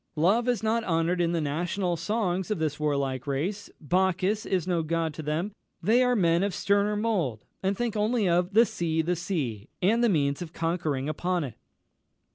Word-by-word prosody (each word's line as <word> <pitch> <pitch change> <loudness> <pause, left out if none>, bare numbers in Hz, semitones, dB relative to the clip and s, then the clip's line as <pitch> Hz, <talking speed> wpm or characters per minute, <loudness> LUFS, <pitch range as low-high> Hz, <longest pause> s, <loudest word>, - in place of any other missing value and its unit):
Love 205 +10 +3
is 240 -4 +1
not 225 +1 +1
honoured 170 0 +1
in 170 -1 +1
the 170 - 0
national 175 +5 -1
songs 185 0 -1
of 215 - 0
this 155 -2 -2
warlike 140 -3 -1
race 180 +9 -2
Bacchus 185 +5 +1
is 185 -4 0
no 175 -2 +1
god 165 0 -1
to 155 - -6
them; 155 +7 -2 0.3
they 220 +8 +3
are 250 -1 +3
men 170 -4 +3
of 200 -2 -1
sterner 205 +1 +2
mould, 190 - -1 0.2
and 195 +1 0
think 240 -3 -1
only 215 0 +1
of 175 +2 +1
'the 230 +2 +7
Sea, 165 -5 -1
the 175 +2 0
Sea!' 145 - -3
and 225 +6 +3
the 235 - +4
means 140 -5 +1
of 170 -1 -7
conquering 165 -5 -1
upon 175 +2 -1
it." 130 -5 -5
175 Hz, 190 wpm, -27 LUFS, 160-205 Hz, 0.3 s, the